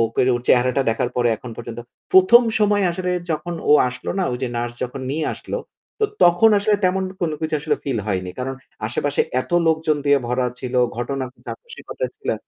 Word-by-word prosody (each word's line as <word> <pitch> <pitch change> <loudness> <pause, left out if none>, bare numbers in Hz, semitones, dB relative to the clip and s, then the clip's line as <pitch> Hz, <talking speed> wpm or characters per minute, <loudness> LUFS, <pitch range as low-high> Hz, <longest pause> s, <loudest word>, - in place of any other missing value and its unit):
করে 130 - +3
ওর 120 - -3
চেহারাটা 125 +2 +3
দেখার 115 +2 -1
পরে 120 -1 +2
এখন 125 - -10
পর্যন্ত 120 0 -7 0.3
১ম 190 +6 +7 0.2
সময় 205 -2 +3
আসলে 180 +1 -3 0.2
যখন 165 +3 -2 0.2
ও - - +8 0.2
আসলো 125 0 -6
না? 190 - +1
ওই 125 - -3
যে 125 - 0
নার্স 120 0 -3
যখন 125 +2 -7
নিয়ে 155 +2 -1
আসলো। - - -5 0.4
তো - - +4 0.2
তখন 175 +6 +6
আসলে 210 +1 +2
তেমন 190 +1 +2 0.2
কোন 170 -2 0
কিছু 160 -1 -2
আসলে 150 0 0
ফিল 130 -5 -1
হয়নি। 95 -3 -2
কারণ 135 +1 -3 0.3
আশেপাশে 140 +5 -1 0.2
এত - - -9 0.2
লোকজন 160 -1 +2
দিয়ে 145 -1 +4
ভরা 125 +1 0
ছিল, 125 0 -5 0.2
ঘটনা 130 +2 -2 0.2
যা - - -3
খুশি 475 - -11
ঘটেছিলো। - - -3
140 Hz, 190 wpm, -21 LUFS, 125-180 Hz, 0.4 s, ও